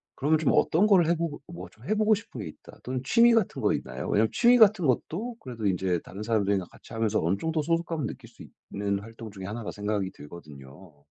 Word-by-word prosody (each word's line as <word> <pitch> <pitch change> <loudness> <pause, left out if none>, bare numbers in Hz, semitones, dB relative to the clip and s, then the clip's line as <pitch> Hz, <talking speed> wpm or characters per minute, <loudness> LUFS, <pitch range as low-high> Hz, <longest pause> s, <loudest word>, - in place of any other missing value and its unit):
그러면 150 +3 +2
좀 150 - +2
어떤 185 +7 +3
거를 185 -6 +5
해 170 - +3
보고 165 -4 -4
'뭐 170 0 -9
좀 - - -19
해보고 215 +1 +3
싶은 195 - -9
게 100 - -6
있다.' 75 - -13
또는 130 0 -3
취미 235 - +5
같은 225 -4 +1
거 - - +2
있나요? - - -5
왜냐하면 110 +2 +3
취미 245 +1 +5
같은 215 -6 +5
것도 195 - -1
그래도 120 -4 -7
인제 90 -2 0
다른 95 +4 -9
사람들이랑 100 -4 0
같이 - - -15
하면서 110 -1 0
어느 90 +4 +1
정도 160 +5 -1
소속감을 165 -2 -1
느낄 - - -9
수 - - -14 0.3
있는 100 0 -1
활동 115 +1 -10
중에 95 -2 -8
1 110 +4 -5
라 - - -5
생각이 105 -2 -2
들거든요. 75 0 -13
115 Hz, 445 characters per minute, -27 LUFS, -, 0.3 s, 거를